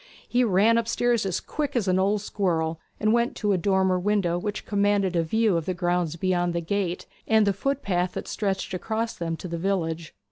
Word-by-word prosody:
He 250 +1 +2
ran 225 +2 +4
upstairs 230 -1 +1
as 185 - -1
quick 295 -4 -4
as 225 -5 +1
an 185 0 +3
old 200 +2 +2
squirrel, 165 -6 -1 0.2
and 215 +1 +2
went 235 +1 +1
to 210 -2 0
a - - +2
dormer 190 0 +2
window 180 -3 +1
which 205 +2 -4
commanded 200 -3 +1
a 170 - +3
view 215 +4 +2
of 165 - -4
the 185 - -1
grounds 175 -2 0
beyond 175 0 0
the - - +1
gate, 180 0 -2 0.2
and 220 -1 +4
the 200 - +2
footpath 195 -6 -1
that - - -5
stretched 195 -3 -2
across 225 +5 -2
them 165 -1 -3
to 180 - -7
the 170 -1 -4
village. 165 -3 -2
190 Hz, 205 wpm, -25 LUFS, 175-215 Hz, 0.2 s, ran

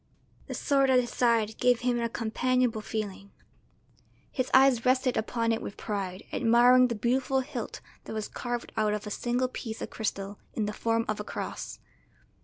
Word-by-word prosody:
The - - -5
sword 275 -2 +2
at 255 -1 +6
his 240 -1 -2
side 230 -3 +1
gave 245 -1 +3
him 245 -1 +1
a 235 0 -1
companionable 240 0 0
feeling; 205 -2 -5 1.0
his 255 -2 -1
eyes 260 -3 +5
rested 255 0 +2
upon 230 +1 0
it 225 - 0
with 200 - -7
pride, 195 -3 -4
admiring 245 +2 +6
the 235 - -2
beautiful 260 +4 +1
hilt 255 -3 -6 0.2
that - - -6
was 215 -1 -3
carved 240 -1 -4
out 210 -1 +1
of 210 - -6
a 210 - -5
single 245 +4 0
piece 225 -3 -6
of - - -6
crystal 200 -2 -3 0.2
in 215 - 0
the 210 - -3
form 230 +1 0
of 215 -1 -2
a - - -3
cross. - - -5
235 Hz, 180 wpm, -28 LUFS, 215-250 Hz, 1.0 s, at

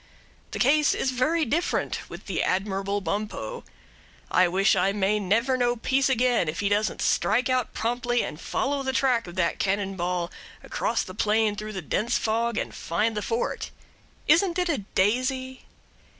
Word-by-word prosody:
The - - -5
case 295 +3 +3
is 260 - 0
very 305 +6 +1
different 320 +9 -1
with - - -9
the - - -1
admirable 195 +1 -1
Bumppo. 210 - -4 0.7
I 185 - +5
wish 195 +4 +3
I 190 +1 +2
may 205 +1 +1
never 230 +7 +1
know 245 -1 +2
peace 260 +3 +1
again 250 -7 +2
if 160 - -4
he 200 - +1
doesn't 205 +1 0
strike 245 +6 +2
out 255 -2 0
promptly 240 +1 0
and 150 - -6
follow 280 +1 -1
the 265 -1 -2
track 245 -4 +2
of 175 - -9
that 180 -2 0
cannon 195 0 0
ball 175 -1 -2 0.3
across - - -1
the 185 - -9
plain 215 +1 +1
through 215 +1 -6
the 190 -4 -5
dense 210 +10 0
fog 230 +1 0
and - - -3
find 215 +7 -1
the 210 - -1
fort. 230 +3 -2 0.6
Isn't 345 0 +4
it 360 -1 0
a 295 - +1 0.2
daisy? 255 +6 0
225 Hz, 170 wpm, -26 LUFS, 195-260 Hz, 0.7 s, I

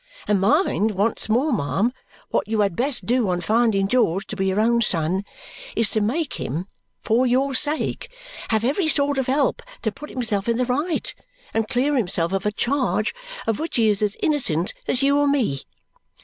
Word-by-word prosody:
And 205 -2 +2
mind 220 - +2
once 215 +3 0
more, 255 +7 +2
ma'am, 210 - 0 0.4
what - - 0
you 220 0 +1
had 200 -4 +1
best 260 - +1
do 240 -3 +1
on 180 -1 0
finding 210 +1 +2
George 200 -5 +1
to 215 - -6
be 195 -1 -1
your 190 +2 +1
own 235 +2 +3
son 180 -2 +1 0.5
is 225 - +2
to 215 - +1
make 280 +9 -1
him 160 +8 -3 0.4
for 240 +4 +2
your 265 +3 +1
sake 300 - -1 0.4
have 220 -1 +1
every 300 +8 +1
sort 285 -2 +2
of 265 - -1
help 270 +1 +1 0.2
to 220 - 0
put 300 +8 -10
himself 225 -4 -2
in 230 - +1
the 250 - +1
right 295 +7 -1 0.4
and 225 -1 0
clear 270 +5 +1
himself 180 -7 0
of 195 +2 -1
a - - +1
charge 240 -1 0 0.3
of 225 - -1
which 325 +2 -4
he 225 -2 +3
is 205 -1 +2
as 210 -1 0
innocent 190 - +1
as 255 - +2
you 280 +1 +3
or 290 - +3
me. 240 - 0
230 Hz, 190 wpm, -22 LUFS, 200-270 Hz, 0.5 s, own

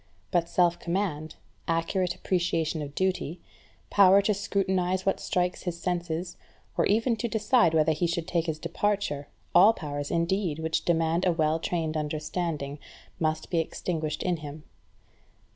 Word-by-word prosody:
But 170 -2 +1
self 175 -1 +2
command, 170 -4 -2 0.3
accurate 170 +2 0
appreciation 165 -3 0
of 145 -1 -7
duty, 185 -3 -1 0.5
power 195 -1 +7
to 210 - +2
scrutinize 190 -2 0
what 195 - +1
strikes 180 0 -1
his 175 -2 -4
senses, 175 -1 -3 0.4
or - - +2
even 225 +3 +2
to 235 - -1
decide 220 -5 +3
whether 160 0 +4
he 160 +3 0
should 170 -1 -2
take 170 -1 0
his 160 -1 -1
departure, 170 -3 -1 0.3
all 195 +6 +7
powers, 145 -5 -5
indeed, 170 -1 0
which 160 0 -1
demand 165 +1 +2
a - - +4
well 160 -1 +1
trained 160 -2 -2
understanding, 150 -1 -3 0.4
must 155 -1 -1
be 170 - +2
extinguished 160 -1 -3
in 180 -2 0
him. 150 0 -9
170 Hz, 145 wpm, -27 LUFS, 160-185 Hz, 0.5 s, power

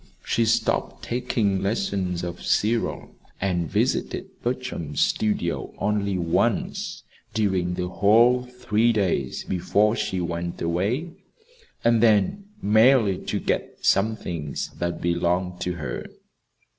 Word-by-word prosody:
She 115 - +2
stopped 115 0 0
taking 115 -6 0
lessons 95 -3 -1
of 85 0 -5
Cyril, 115 +2 0 0.3
and 90 -4 -1
visited - - -1
Bertram's 120 - -3
studio 105 -6 0
only 100 -2 0
once 85 -2 -1 0.3
during 95 -5 +1
the 90 0 -2
whole 115 +7 +4
three 120 -2 +1
days 90 -11 0
before 105 +4 +1
she 95 -3 -2
went 85 0 -3
away, 100 - -1 0.7
and 115 -1 +4
then 110 - +3 0.2
merely 110 -1 +5
to - - -1
get - - -3
some 110 +3 +3
things 80 -8 -4
that 85 0 -2
belonged 90 +1 0
to 90 - -1
her. 80 -4 -5
100 Hz, 115 wpm, -24 LUFS, 90-115 Hz, 0.7 s, merely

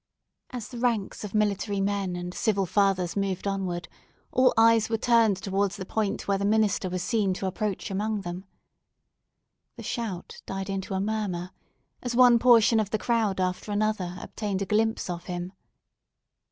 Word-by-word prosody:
As 245 -4 -6
the 240 - -7
ranks 230 -6 -1
of 210 0 -6
military 205 -1 +1
men 195 -2 -1
and 175 0 -5
civil 200 -3 +1
fathers 185 -2 +1
moved 195 -2 -2
onward, 185 -3 -2 0.4
all 255 0 +4
eyes 225 -1 +5
were 225 - +1
turned 230 -4 +3
towards 195 +1 -1
the 190 - -6
point 210 0 -2
where 200 -1 +1
the - - -2
minister 205 -2 +2
was 180 0 -3
seen 200 -3 +1
to 190 - -4
approach 195 +1 -3
among 210 +2 -1
them. 180 +1 -6 1.3
The - - -9
shout 215 -8 -5
died 195 +1 -4
into 195 0 -3
a - - 0
murmur, 195 -4 -2 0.5
as 245 -1 -3
one 245 -1 +7
portion 230 -2 +6
of 210 -2 -1
the 215 - 0
crowd 220 -4 0
after 185 +3 -2
another 205 -4 -1
obtained 200 0 -3
a - - -4
glimpse 220 +3 +1
of 175 -1 -5
him. 180 +1 -5
200 Hz, 165 wpm, -27 LUFS, 190-220 Hz, 1.3 s, one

